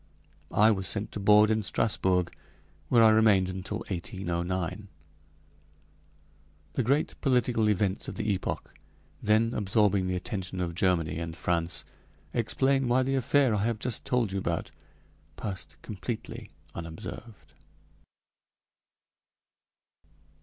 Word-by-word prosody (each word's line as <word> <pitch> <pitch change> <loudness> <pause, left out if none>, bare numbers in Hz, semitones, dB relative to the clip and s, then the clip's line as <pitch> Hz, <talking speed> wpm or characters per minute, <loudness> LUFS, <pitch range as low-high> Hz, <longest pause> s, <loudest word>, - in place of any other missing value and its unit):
I 110 +2 +5
was 95 -3 -1
sent 100 +4 -3
to - - -5
board 105 +2 +6
in 110 0 +2
Strasbourg, 95 -4 0 0.6
where 115 -2 +6
I 110 - +7
remained 105 -4 +4
until 95 +3 -4
1809. 90 +1 -3 1.9
The - - 0
great 140 +6 0
political 125 -4 +2
events 100 -1 0
of - - -5
the 105 -1 0
epoch 95 - -4 0.5
then 110 +2 +2
absorbing 100 -2 +2
the 90 - -1
attention 90 0 -4
of 85 -2 -2
Germany 85 -3 +1
and 85 -1 -5
France 85 0 -1 0.5
explain 135 +3 +2
why 125 +2 +3
the 135 +1 -1
affair 135 -1 +3
I 105 -1 0
have 115 -1 0
just 120 +1 -3
told 120 -5 0
you 95 - -1
about - - -2 0.6
passed 100 -4 -6
completely 110 +3 -6 0.2
unobserved. 85 +7 -9
105 Hz, 120 wpm, -28 LUFS, 90-115 Hz, 1.9 s, I